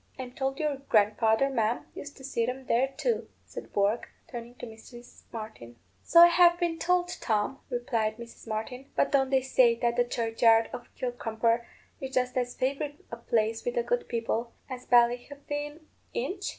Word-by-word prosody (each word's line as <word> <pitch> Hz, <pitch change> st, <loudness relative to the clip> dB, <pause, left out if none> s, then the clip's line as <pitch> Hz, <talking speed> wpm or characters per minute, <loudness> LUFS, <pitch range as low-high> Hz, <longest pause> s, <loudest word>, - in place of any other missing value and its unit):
I'm 255 Hz, -2 st, -6 dB
told 270 Hz, +1 st, -3 dB
your 300 Hz, -3 st, 0 dB
grandfather, 220 Hz, 0 st, +2 dB
ma'am, 235 Hz, -3 st, -1 dB
used 285 Hz, 0 st, -9 dB
to 265 Hz, -, -13 dB
see 235 Hz, -3 st, -1 dB
'em 260 Hz, +1 st, -4 dB
there 250 Hz, +3 st, +2 dB
too," 465 Hz, +7 st, -1 dB, 0.2 s
said -, -, -9 dB
Bourke, 205 Hz, +3 st, 0 dB, 0.2 s
turning 240 Hz, -1 st, -8 dB
to -, -, -8 dB
Mrs. 240 Hz, +2 st, -13 dB
Martin. 215 Hz, -, -8 dB, 0.3 s
"So 335 Hz, -, +6 dB
I -, -, +12 dB
have 345 Hz, 0 st, +5 dB
been 340 Hz, -2 st, -1 dB
told, 355 Hz, 0 st, +1 dB
Tom," 220 Hz, +4 st, 0 dB
replied 225 Hz, -3 st, -1 dB
Mrs. 235 Hz, -1 st, -12 dB
Martin. 240 Hz, +5 st, -5 dB
"But -, -, +2 dB
don't 270 Hz, -2 st, +3 dB
they 265 Hz, -1 st, +3 dB
say 255 Hz, -3 st, +4 dB
that 235 Hz, +1 st, -1 dB
the 245 Hz, -, +5 dB
churchyard 230 Hz, -1 st, +2 dB
of 240 Hz, -, -8 dB
Kilcrumper 235 Hz, -1 st, -1 dB, 0.3 s
is 265 Hz, -1 st, -6 dB
just 250 Hz, -1 st, 0 dB
as 245 Hz, -1 st, -1 dB
favourite 280 Hz, +3 st, -3 dB
a 235 Hz, -, -5 dB
place 225 Hz, -1 st, 0 dB
with 485 Hz, -, -2 dB
the 480 Hz, -, +1 dB
good -, -, -1 dB
people 235 Hz, 0 st, -2 dB
as 255 Hz, -1 st, -8 dB
Ballyhefaan 285 Hz, +5 st, +1 dB, 0.3 s
inch?" 400 Hz, -5 st, -3 dB
245 Hz, 175 wpm, -28 LUFS, 230-280 Hz, 0.3 s, I